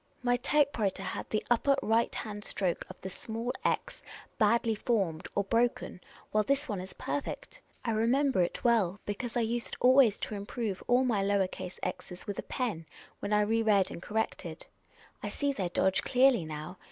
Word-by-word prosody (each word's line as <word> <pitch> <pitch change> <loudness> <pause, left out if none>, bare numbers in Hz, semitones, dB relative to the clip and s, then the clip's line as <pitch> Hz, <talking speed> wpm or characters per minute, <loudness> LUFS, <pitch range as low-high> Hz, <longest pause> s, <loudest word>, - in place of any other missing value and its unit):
My 245 0 +3
type 285 +1 +2
writer 195 -2 0
had - - -4
the 215 - -1
upper 275 +4 +4
right 225 +1 +2
hand 210 -2 -5
stroke 185 -5 -1
of 185 - -10
the 190 - -5
small 225 +5 -4
x - - -1 0.4
badly 225 +1 +3
formed, 195 -7 -1
or 200 - +2
broken, 230 -3 0 0.3
while 215 0 +3
this 280 +5 +1
one 205 -6 -3
is 185 0 -8
perfect. 290 - -5 0.2
I 230 - +1
remember 240 +1 +2
it 175 - -1
well, 210 -6 +3
because 230 +4 -3
I - - +3
used 230 +1 -2
always 255 -4 +6
to - - -3
improve 205 0 -3
all 250 +2 +4
my 220 -5 +1
lower 200 -1 +2
case 180 0 -8
.r's 180 0 -5
with 205 - -4
a - - -7
pen 205 -11 -2 0.3
when - - -4
I 210 0 +4
re 225 +2 +2
read 205 -4 +3
and - - -7
corrected. 220 - -3 0.6
I - - -3
see 285 -1 -1
their 190 -8 -2
dodge 190 +2 +2
clearly 255 -7 +4
now. 155 +4 -7
220 Hz, 185 wpm, -30 LUFS, 195-245 Hz, 0.6 s, always